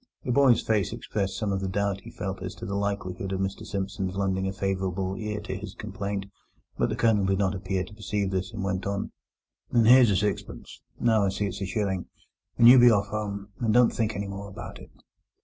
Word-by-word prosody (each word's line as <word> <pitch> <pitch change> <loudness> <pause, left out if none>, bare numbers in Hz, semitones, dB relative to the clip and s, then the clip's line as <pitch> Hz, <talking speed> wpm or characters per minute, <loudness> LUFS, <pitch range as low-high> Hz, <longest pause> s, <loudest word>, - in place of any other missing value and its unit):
The 125 - -2
boy's 130 -2 +5
face 105 -4 +1
expressed 100 -2 -3
some 105 -3 -1
of 95 - 0
the 95 - -2
doubt 100 +1 -1
he - - -11
felt 95 -1 -5
as 90 -1 -5
to - - -8
the 100 - -4
likelihood 100 -2 -2
of 95 - -2
Mr 95 0 -3
Simpson's 95 -1 -3
lending 95 -1 0
a - - -1
favourable 95 -1 -2
ear 105 +1 -3
to 105 - -5
his 100 +3 -7
complaint, 100 -1 -4 0.5
but - - +1
the - - -1
Colonel 110 -3 +3
did 95 0 +2
not 95 -2 +1
appear 95 -1 -2
to 105 - -12
perceive 105 -2 -2
this, 95 +1 -2
and 100 -4 -5
went 95 0 -2
on: 100 0 -2 0.6
"And 115 -2 +3
here's 125 -1 +8
a 100 - +2
sixpence—no, 105 +2 -1
I - - +2
see 100 +2 -2
it's 100 0 -4
a 95 - -2
shilling—and 100 +3 -1
you 125 +1 +10
be 120 0 +8
off 100 -3 +2
home, 100 -1 -4
and 115 -2 +1
don't 125 -1 +5
think 110 -1 -1
any 100 0 -3
more 100 +1 -6
about 95 - -9
it." - - -13
100 Hz, 220 wpm, -27 LUFS, 95-105 Hz, 0.6 s, you